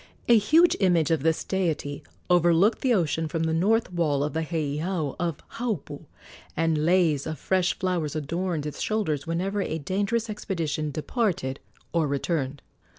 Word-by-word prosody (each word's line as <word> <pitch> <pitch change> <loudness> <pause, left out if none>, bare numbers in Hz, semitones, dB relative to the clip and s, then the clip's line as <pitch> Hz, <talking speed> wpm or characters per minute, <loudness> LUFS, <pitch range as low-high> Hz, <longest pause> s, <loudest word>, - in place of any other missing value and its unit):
A 235 - +7
huge 315 - +5
image 170 -5 +3
of 160 -4 +2
this 160 +2 +1
deity 160 -7 -2 0.3
overlooked 175 +4 +4
the 260 - +2
ocean 165 -6 +1
from 165 +1 -2
the 160 0 0
north 200 +4 +2
wall 150 -5 +1
of 150 - -2
the 160 - -1
heiau 155 0 -2
of 170 -4 -3
Haupu, 165 - -3 0.5
and 160 -2 +1
leis 170 -6 +3
of 155 - -4
fresh 185 -1 +1
flowers 170 -5 -1
adorned 165 +1 -2
its 150 - -5
shoulders 160 -10 -1
whenever 190 +5 -1
a 160 - -2
dangerous 200 +8 -1
expedition 165 -8 -3
departed 155 - -1 0.3
or 165 -3 +2
returned. 140 -1 -2
165 Hz, 150 wpm, -26 LUFS, 150-190 Hz, 0.5 s, A